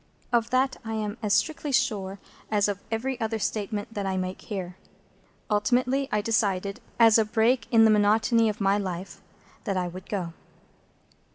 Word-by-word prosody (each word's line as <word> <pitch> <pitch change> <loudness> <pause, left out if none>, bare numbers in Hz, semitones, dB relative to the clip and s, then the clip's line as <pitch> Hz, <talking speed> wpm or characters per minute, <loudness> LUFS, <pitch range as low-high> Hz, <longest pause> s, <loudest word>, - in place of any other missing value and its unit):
Of 235 -1 +2
that 255 +1 +1
I 225 -1 -5
am 210 -1 -3
as 210 - -2
strictly 295 +5 -1
sure 200 -6 0 0.3
as 205 -1 +2
of 200 -1 -3
every 245 +3 -2
other 225 0 -1
statement 210 0 -3
that 200 -2 -3
I 190 0 -1
make 185 0 -4
here. 185 -4 -5 0.7
Ultimately 250 +6 +1
I 210 - +1
decided, 200 -3 0 0.2
as 225 -1 +6
a - - +4
break 230 +4 +1
in 225 -2 +6
the 220 - +6
monotony 220 +2 +3
of 210 +2 -4
my 200 0 +2
life, 185 -1 -5 0.4
that 195 -4 -1
I 180 -1 0
would 185 +2 -9
go. 180 -5 -3
210 Hz, 170 wpm, -26 LUFS, 195-230 Hz, 0.7 s, as